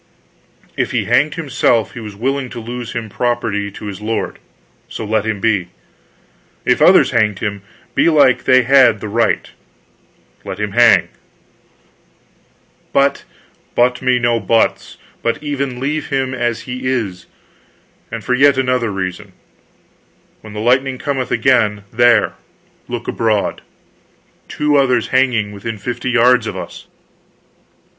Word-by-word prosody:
"If -, -, -2 dB
he -, -, 0 dB
hanged 145 Hz, +1 st, +2 dB
himself, 125 Hz, -7 st, 0 dB
he -, -, -8 dB
was 105 Hz, -3 st, -8 dB
willing 135 Hz, +4 st, -2 dB
to 120 Hz, -, -7 dB
lose 120 Hz, +1 st, -6 dB
him 115 Hz, -2 st, -4 dB
property 110 Hz, -3 st, -2 dB
to -, -, -9 dB
his 100 Hz, -1 st, -7 dB
lord; 110 Hz, +1 st, -3 dB, 0.5 s
so 110 Hz, -, -6 dB
let 110 Hz, 0 st, 0 dB
him 110 Hz, -2 st, -2 dB
be. 100 Hz, -5 st, +1 dB, 1.0 s
If -, -, +2 dB
others -, -, +6 dB
hanged 105 Hz, -4 st, +1 dB
him, 100 Hz, -2 st, -4 dB, 0.3 s
belike 145 Hz, -6 st, +3 dB
they 130 Hz, 0 st, +5 dB
had 130 Hz, -4 st, +5 dB
the 105 Hz, -, -6 dB
right 115 Hz, +3 st, 0 dB, 0.9 s
let 95 Hz, -, -7 dB
him 105 Hz, -1 st, -2 dB
hang." 120 Hz, +1 st, +5 dB, 1.8 s
"But 140 Hz, 0 st, +1 dB, 0.2 s
" -, -, -37 dB
"But 125 Hz, +1 st, +2 dB
me 130 Hz, -1 st, +2 dB
no 120 Hz, -1 st, +1 dB
buts, 115 Hz, 0 st, 0 dB, 0.2 s
but 115 Hz, +5 st, -2 dB
even 140 Hz, -4 st, -3 dB
leave 150 Hz, +3 st, -2 dB
him 135 Hz, -1 st, -1 dB
as 120 Hz, -2 st, -2 dB
he 125 Hz, 0 st, -5 dB
is. 105 Hz, -9 st, -3 dB, 0.8 s
And -, -, -5 dB
for 125 Hz, -, -1 dB
yet 140 Hz, +2 st, +4 dB
another 125 Hz, -3 st, 0 dB
reason. 95 Hz, +1 st, -5 dB, 1.1 s
When 110 Hz, -1 st, -11 dB
the 105 Hz, -, -5 dB
lightning 130 Hz, +3 st, +1 dB
cometh 135 Hz, -2 st, -3 dB
again 115 Hz, -4 st, +2 dB
there, 120 Hz, -1 st, +4 dB, 0.5 s
look -, -, -5 dB
abroad." 110 Hz, -3 st, -1 dB, 0.9 s
Two 150 Hz, -1 st, +1 dB
others 125 Hz, -4 st, +2 dB
hanging, 125 Hz, -5 st, +1 dB
within 105 Hz, +2 st, -6 dB
fifty 120 Hz, +4 st, -4 dB
yards 125 Hz, -1 st, +3 dB
of -, -, -5 dB
us! -, -, -9 dB
120 Hz, 135 wpm, -17 LUFS, 110-130 Hz, 1.8 s, others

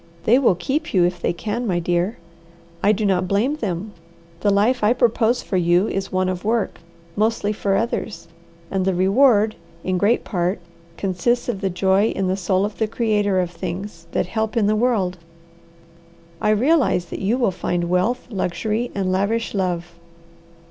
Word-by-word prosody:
They 240 Hz, +7 st, +5 dB
will 240 Hz, -9 st, +3 dB
keep 270 Hz, -, -2 dB
you 180 Hz, -, +5 dB
if 175 Hz, 0 st, -2 dB
they -, -, +1 dB
can, 225 Hz, +7 st, -3 dB
my 180 Hz, -3 st, +1 dB
dear. 175 Hz, +4 st, 0 dB, 0.6 s
I 205 Hz, -, +4 dB
do 215 Hz, 0 st, 0 dB
not 185 Hz, -2 st, +1 dB
blame 225 Hz, +10 st, +1 dB
them. 205 Hz, -, -3 dB, 0.5 s
The 205 Hz, -, +1 dB
life 215 Hz, +5 st, +2 dB
I 210 Hz, +3 st, +5 dB
propose 240 Hz, -1 st, +2 dB
for 190 Hz, -, -1 dB
you 175 Hz, +3 st, +3 dB
is 195 Hz, 0 st, -3 dB
one 185 Hz, 0 st, +1 dB
of 185 Hz, -1 st, -3 dB
work, 225 Hz, 0 st, -1 dB, 0.4 s
mostly 215 Hz, -1 st, +1 dB
for 200 Hz, -2 st, 0 dB
others, 225 Hz, -4 st, -2 dB, 0.4 s
and 195 Hz, -1 st, 0 dB
the 190 Hz, -1 st, +1 dB
reward, 210 Hz, +3 st, +4 dB, 0.3 s
in 185 Hz, -1 st, 0 dB
great 215 Hz, +5 st, +2 dB
part, 180 Hz, 0 st, -1 dB, 0.4 s
consists 200 Hz, +6 st, 0 dB
of 200 Hz, -5 st, -3 dB
the 195 Hz, -, 0 dB
joy 190 Hz, +3 st, +2 dB
in 195 Hz, -, -1 dB
the 185 Hz, -, +1 dB
soul 190 Hz, 0 st, +1 dB
of 210 Hz, -, -6 dB
the 220 Hz, -, +1 dB
creator 210 Hz, -4 st, +1 dB
of 180 Hz, -1 st, -1 dB
things 175 Hz, 0 st, -6 dB
that -, -, 0 dB
help 220 Hz, +4 st, -2 dB
in 220 Hz, -, +3 dB
the 210 Hz, +1 st, +2 dB
world. 210 Hz, -6 st, 0 dB, 1.2 s
I -, -, +2 dB
realize 245 Hz, -, +3 dB
that -, -, -4 dB
you 210 Hz, +6 st, +1 dB
will 240 Hz, -6 st, +2 dB
find 175 Hz, -1 st, -2 dB
wealth, 185 Hz, +8 st, 0 dB
luxury, 215 Hz, +4 st, -2 dB
and 190 Hz, -2 st, 0 dB
lavish 205 Hz, +5 st, 0 dB
love. 175 Hz, -3 st, -2 dB
200 Hz, 175 wpm, -21 LUFS, 185-225 Hz, 1.2 s, They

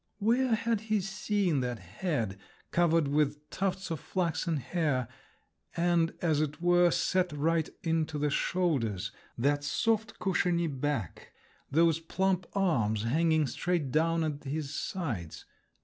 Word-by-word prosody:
Where 235 Hz, +3 st, +2 dB
had 230 Hz, -1 st, 0 dB
he 215 Hz, -1 st, 0 dB
seen 195 Hz, -4 st, 0 dB
that 125 Hz, -2 st, -2 dB
head, 105 Hz, -, -3 dB, 0.3 s
covered 165 Hz, -3 st, +3 dB
with 150 Hz, +1 st, 0 dB
tufts 190 Hz, -1 st, -2 dB
of 160 Hz, -, -2 dB
flaxen 170 Hz, -2 st, -1 dB
hair, 135 Hz, -2 st, -1 dB, 0.7 s
and 170 Hz, -1 st, +2 dB
as 155 Hz, -3 st, +2 dB
it 150 Hz, 0 st, -2 dB
were 175 Hz, 0 st, +4 dB
set 180 Hz, +1 st, +1 dB
right 160 Hz, +2 st, +1 dB
into 160 Hz, -2 st, 0 dB
the 150 Hz, 0 st, 0 dB
shoulders, 130 Hz, -, 0 dB, 0.3 s
that 145 Hz, +4 st, +1 dB
soft 220 Hz, -, 0 dB
cushiony 175 Hz, -3 st, +1 dB
back, 140 Hz, -, -3 dB, 0.4 s
those 165 Hz, +2 st, +3 dB
plump 185 Hz, +2 st, 0 dB
arms 115 Hz, -, +1 dB
hanging 160 Hz, +5 st, +2 dB
straight 155 Hz, 0 st, -1 dB
down 165 Hz, +2 st, +2 dB
at 150 Hz, -2 st, -3 dB
his 145 Hz, 0 st, -3 dB
sides? 120 Hz, -, -4 dB
165 Hz, 130 wpm, -30 LUFS, 145-180 Hz, 0.7 s, were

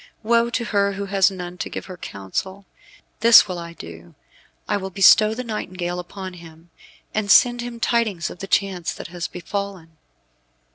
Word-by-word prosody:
Woe 235 Hz, +1 st, +3 dB
to 235 Hz, 0 st, -2 dB
her 200 Hz, -2 st, +1 dB
who 200 Hz, +1 st, -4 dB
has 195 Hz, -1 st, +3 dB
none 180 Hz, -2 st, -8 dB
to -, -, -4 dB
give -, -, -6 dB
her 185 Hz, -, -9 dB
counsel. 180 Hz, -, -6 dB, 0.5 s
This 230 Hz, +1 st, +8 dB
I 185 Hz, -, -4 dB
will 170 Hz, -1 st, -7 dB
do. 85 Hz, -, -12 dB, 0.5 s
I 210 Hz, -, 0 dB
will 190 Hz, -1 st, -3 dB
bestow 210 Hz, +3 st, +5 dB
the 250 Hz, -, -4 dB
nightingale 185 Hz, -6 st, -4 dB
upon 185 Hz, +1 st, -8 dB
him, 165 Hz, -1 st, -15 dB, 0.4 s
and 215 Hz, -1 st, -2 dB
send 240 Hz, +3 st, +5 dB
him 240 Hz, -1 st, -7 dB
tidings 225 Hz, -8 st, 0 dB
of -, -, -12 dB
the 195 Hz, -, -6 dB
chance 190 Hz, -3 st, 0 dB
that -, -, -9 dB
has 175 Hz, -1 st, -5 dB
befallen." 180 Hz, -3 st, -6 dB
190 Hz, 175 wpm, -22 LUFS, 175-210 Hz, 0.5 s, This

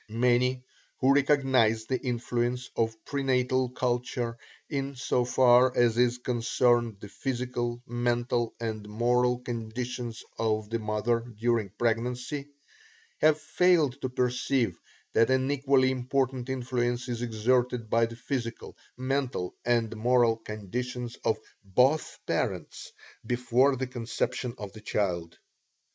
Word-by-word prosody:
Many 125 Hz, +2 st, +2 dB, 0.3 s
who 135 Hz, +1 st, +4 dB
recognize 130 Hz, -6 st, +3 dB
the 130 Hz, +2 st, -1 dB
influence 120 Hz, 0 st, -2 dB
of 110 Hz, -1 st, -1 dB
pre 140 Hz, -1 st, -2 dB
natal 130 Hz, -1 st, +1 dB
culture 120 Hz, -1 st, -1 dB, 0.3 s
in 140 Hz, -2 st, -3 dB
so 125 Hz, -1 st, +1 dB
far 125 Hz, 0 st, +5 dB
as 120 Hz, -2 st, +4 dB
is 125 Hz, 0 st, +3 dB
concerned 120 Hz, -2 st, +1 dB
the 105 Hz, -, -9 dB
physical, 120 Hz, 0 st, -3 dB
mental, 120 Hz, 0 st, 0 dB
and 110 Hz, -2 st, -4 dB
moral 125 Hz, +3 st, +2 dB
condition 120 Hz, 0 st, -4 dB, 0.3 s
of 110 Hz, -1 st, 0 dB
the 115 Hz, -, 0 dB
mother 110 Hz, +2 st, 0 dB, 0.2 s
during 115 Hz, -3 st, +1 dB
pregnancy, 125 Hz, +5 st, -1 dB, 0.7 s
have 155 Hz, 0 st, +4 dB
failed 160 Hz, -7 st, +2 dB
to 130 Hz, -, -2 dB
perceive 125 Hz, -4 st, 0 dB, 0.4 s
that 115 Hz, -, +4 dB
an 130 Hz, +1 st, +2 dB
equally 135 Hz, -2 st, +3 dB
important 130 Hz, 0 st, -1 dB
influence 120 Hz, -1 st, -1 dB
is 120 Hz, -1 st, -3 dB
exerted 120 Hz, +1 st, +1 dB
by 115 Hz, +1 st, +3 dB
the 115 Hz, -, -9 dB
physical, 120 Hz, -1 st, -4 dB, 0.2 s
mental 130 Hz, -7 st, -2 dB
and 115 Hz, -2 st, +1 dB
moral 120 Hz, 0 st, +3 dB
condition 120 Hz, +3 st, -5 dB
of 110 Hz, -2 st, +2 dB, 0.3 s
BOTH 125 Hz, +10 st, +2 dB
PARENTS -, -, -3 dB, 0.3 s
before 125 Hz, +3 st, +2 dB
the 130 Hz, +1 st, -2 dB
conception 125 Hz, 0 st, -3 dB
of 105 Hz, -2 st, -7 dB
the 110 Hz, -, -11 dB
child. 85 Hz, -6 st, -2 dB
120 Hz, 125 wpm, -28 LUFS, 115-130 Hz, 0.7 s, far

